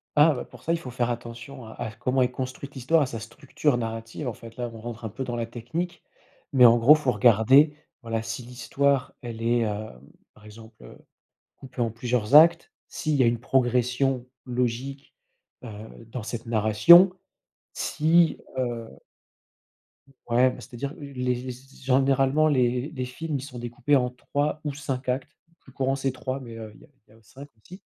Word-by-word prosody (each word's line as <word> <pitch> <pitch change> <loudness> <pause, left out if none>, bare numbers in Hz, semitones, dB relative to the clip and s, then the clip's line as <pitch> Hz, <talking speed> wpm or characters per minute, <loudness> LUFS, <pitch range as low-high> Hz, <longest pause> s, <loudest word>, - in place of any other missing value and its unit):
Ah 150 +1 +6
bah, 130 - -5
pour 125 -1 -16
ça, 165 - 0
il 170 - -1
faut 130 - -8
faire 120 -1 -1
attention 120 +2 -8
à 110 - -10
à 110 - -5
f 110 - -19
comment 130 +1 0
est 125 - 0
construite 130 +2 -6
l'histoire, 140 +5 +2
à - - 0
sa 120 -3 -6
structure 140 +4 -2
narrative, 115 +3 -5
en 120 - -2
fait, 115 +1 -13
là, 120 -1 -3
on 115 - -10
rentre 115 0 -7
un - - -3
peu 130 +6 -5
dans 120 -2 -4
la 115 - -2
technique. 120 +10 -5 0.5
Mais 125 -2 +6
en 120 0 +7
gros, 125 +6 +7
faut 145 -5 0
regarder, 130 +7 +5 0.3
voilà, 115 -1 -3
si 115 +2 -5
l'histoire 130 +3 -1
elle 115 -3 -7
est, 120 +1 +2
hem, 105 - -4 0.3
par 105 - -20
exemple, 110 - -14
heu, - - -13 0.6
coupée 130 -1 -7
en 115 - +1
plusieurs 120 +2 0
actes, 165 +2 +6 0.2
s'il 155 -2 -2
y 130 - +4
a - - +4
une 115 0 +1
progression 125 +1 +1 0.2
logique, 125 +2 -3 0.5
heu, 120 - -7 0.4
dans 115 0 -7
cette 115 +1 -6
narration, 115 - +6 0.6
si 160 +2 +2 0.2
heu 120 -3 -3 1.4
ouais, 125 +2 +4
bah, - - -10
c'est - - -13
à - - -8
dire 140 +3 -4
heu, - - -15
les 125 -3 -2
les 125 +1 -6
z 135 +2 -15
généralement 135 +3 +3
les 125 -1 +1
les 130 -5 -4
films 150 +5 -5
ils - - -6
sont 130 -3 -9
découpés 120 +4 0
en 125 -2 +2
3 145 +4 -2
ou 145 -2 -3
5 135 -3 -4
actes. 130 +1 -3
Le 165 - -32
plus 135 - -18
courant, 135 +1 -1
c'est 135 -1 -1
3 130 +1 -4
mais 115 -3 -10
heu 110 -1 -8
il - - -19
y - - -16
a - - -27 0.2
il - - -34
y - - -20
a - - -20
au - - -23
5 135 +6 -13
aussi. 180 - -14
125 Hz, 205 wpm, -25 LUFS, 115-140 Hz, 1.4 s, en